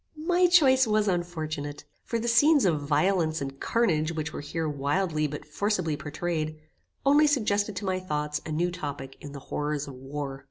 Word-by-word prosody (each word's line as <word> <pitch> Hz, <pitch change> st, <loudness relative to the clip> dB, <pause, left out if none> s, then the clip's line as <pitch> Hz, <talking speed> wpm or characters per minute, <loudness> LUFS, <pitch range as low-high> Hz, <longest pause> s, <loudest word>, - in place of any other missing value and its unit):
My 360 Hz, +1 st, +4 dB
choice 265 Hz, -8 st, +5 dB
was 215 Hz, -1 st, +2 dB
unfortunate, 155 Hz, -5 st, -3 dB, 0.2 s
for 230 Hz, -, -1 dB
the 230 Hz, +1 st, -3 dB
scenes 285 Hz, +3 st, +5 dB
of 160 Hz, -5 st, +2 dB
violence 155 Hz, +2 st, +1 dB
and 135 Hz, 0 st, -6 dB
carnage 165 Hz, -9 st, +1 dB
which 155 Hz, -2 st, -4 dB
were -, -, -5 dB
here 160 Hz, +2 st, -3 dB
wildly 150 Hz, +2 st, 0 dB
but 150 Hz, +1 st, -7 dB
forcibly 180 Hz, -1 st, -1 dB
pourtrayed, 155 Hz, +1 st, -3 dB, 0.5 s
only 290 Hz, +2 st, +6 dB
suggested 210 Hz, -7 st, +1 dB
to 205 Hz, -, -4 dB
my 185 Hz, -1 st, 0 dB
thoughts 150 Hz, -4 st, -2 dB
a 160 Hz, -, -6 dB
new 175 Hz, +3 st, 0 dB
topic 145 Hz, -6 st, -6 dB
in 145 Hz, -1 st, -9 dB
the 140 Hz, -, -7 dB
horrors 150 Hz, -1 st, -2 dB
of 140 Hz, -, -8 dB
war. 135 Hz, +1 st, -6 dB
160 Hz, 175 wpm, -27 LUFS, 150-205 Hz, 0.5 s, only